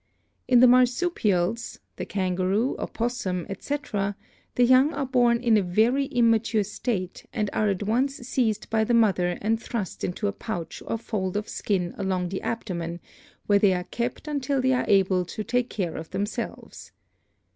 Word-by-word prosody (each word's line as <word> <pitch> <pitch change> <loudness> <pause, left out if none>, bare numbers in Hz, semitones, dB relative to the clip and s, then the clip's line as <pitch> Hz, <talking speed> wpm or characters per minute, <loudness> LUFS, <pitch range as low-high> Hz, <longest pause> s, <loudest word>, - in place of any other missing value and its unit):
In 245 -2 +6
the 255 - +8
Marsupials 240 - +2
— - - -48
the - - -5
kangaroo, 190 +5 0
opossum, 210 -7 -2
etc. 205 -2 -3 0.2
— - - -36
the 245 - +4
young 260 +5 +5
are 280 -1 -1
born 245 -2 +3
in 235 -2 +3
a - - +3
very 225 +9 +2
immature 230 -3 +2
state 195 -2 -4
and 210 -4 -2
are 215 -1 +1
at 195 0 -1
once 255 +6 +1
seized 235 -4 -1
by 220 -1 +3
the 235 +2 +2
mother 185 -6 +2
and 225 +2 +1
thrust 215 -7 -4
into 180 +4 -2
a - - 0
pouch 180 -6 -5
or 230 - -1
fold 205 -4 -3
of 210 - -3
skin 180 -4 -1
along 185 -2 -1
the 190 - -4
abdomen, 175 -7 -4 0.5
where 205 -1 +4
they 200 -2 +4
are 180 - -2
kept 240 +9 -4
until 280 -2 -1
they 260 0 +2
are 250 - +1
able 190 -2 +3
to 195 +5 -6
take 245 +2 0
care 180 -6 -3
of 160 - -7
themselves. 200 +3 -5
215 Hz, 175 wpm, -25 LUFS, 190-245 Hz, 0.5 s, the